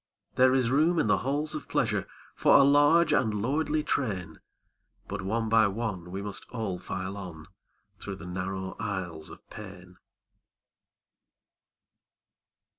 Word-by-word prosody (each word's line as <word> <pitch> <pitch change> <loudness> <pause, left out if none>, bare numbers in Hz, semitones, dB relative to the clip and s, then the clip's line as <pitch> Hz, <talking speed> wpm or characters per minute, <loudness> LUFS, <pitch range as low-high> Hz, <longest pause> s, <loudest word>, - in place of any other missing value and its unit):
There 130 0 +4
is 125 -2 +2
room 160 +5 +3
in - - +2
the 105 - +3
halls 145 +4 -1
of - - -6
pleasure - - 0 0.3
For - - +4
a 140 - +7
large 145 +4 +5
and 110 -4 +1
lordly 150 +6 0
train, 100 - -2 0.7
But 100 -1 -4
one 110 +4 -1
by 110 -1 +5
one 100 -4 -4
we 95 +2 -5
must 100 -2 -6
all 110 -7 -3
file 95 +1 -5
on 85 -5 -8 0.5
Through 100 +1 -6
the 95 - -10
narrow 95 +1 -4
aisles 90 -7 -4
of - - -14
pain. 95 -3 -11
105 Hz, 135 wpm, -28 LUFS, 95-130 Hz, 0.7 s, a